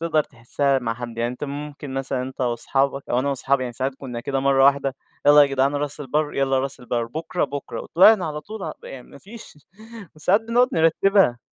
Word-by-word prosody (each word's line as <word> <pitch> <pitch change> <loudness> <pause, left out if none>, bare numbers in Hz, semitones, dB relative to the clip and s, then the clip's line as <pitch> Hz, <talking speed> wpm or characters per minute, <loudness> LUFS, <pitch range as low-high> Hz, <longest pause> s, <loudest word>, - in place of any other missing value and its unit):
تقدر 155 -2 +1
تحسّها 135 +3 -1
مع 115 -2 -3
حد. 120 -1 -8
يعني 115 - +1
أنت 125 - -6
ممكن 145 -1 -7
مثلًا 135 -1 -2
أنت 130 +1 -8
واصحابك 135 +3 -1
أو 120 - +2
أنا 140 +3 0
واصحابي 135 0 0
يعني 120 -1 -4
ساعات 130 +2 -3
كُنّا 125 -3 -7
كده 135 +2 -2
مرّة 135 0 +3
واحدة 140 -1 +3 0.3
يالّا 145 0 +8
جدع 135 -1 +1
راس 145 +1 -3
البر، 150 +2 -1
يالّا 135 -1 +1
راس 135 0 -4
البَر، 120 -1 -2
بكرة، 160 +7 -3
بكرة. 140 0 -6
وطلعنا 185 +1 +5
على 150 0 -4
طول 205 -4 -7
يعني 125 -2 -10
ما - - -14
فيش 205 -2 -13 0.6
وساعات 185 +7 +2
بنقعد 235 +3 +2
نرتّبها. 165 - +3
140 Hz, 195 wpm, -22 LUFS, 130-150 Hz, 0.6 s, يالّا